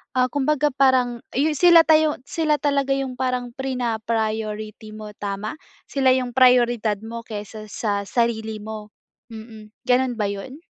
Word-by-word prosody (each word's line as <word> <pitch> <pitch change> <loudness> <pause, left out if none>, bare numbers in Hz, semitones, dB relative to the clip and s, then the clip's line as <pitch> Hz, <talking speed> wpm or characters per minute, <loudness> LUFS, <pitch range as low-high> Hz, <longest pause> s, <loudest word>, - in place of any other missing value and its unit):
ah, 255 -1 +2
kumbaga 295 +1 +1
parang 255 -3 +2 0.2
iyu 300 +4 +2
sila 335 +2 +6
tayo 315 -1 +4
sila 310 0 0
talaga 280 -2 0
yung 265 -2 -4
parang 250 -1 -1
prinapriority 220 -4 -3
mo 215 -1 -8
tama? 205 +8 -4 0.2
Sila 265 -2 +2
yung 250 -1 -2
prayoridad 240 -4 +4
mo 230 +1 -8
kaysa 215 0 -7
sa 200 -2 -3
sarili 220 -1 -1
mo, 215 -1 -7 0.4
mm. 220 -1 -11 0.2
Gano'n 250 0 +2
ba 205 -2 -1
yun? 260 +10 -8
245 Hz, 140 wpm, -22 LUFS, 215-265 Hz, 0.4 s, sila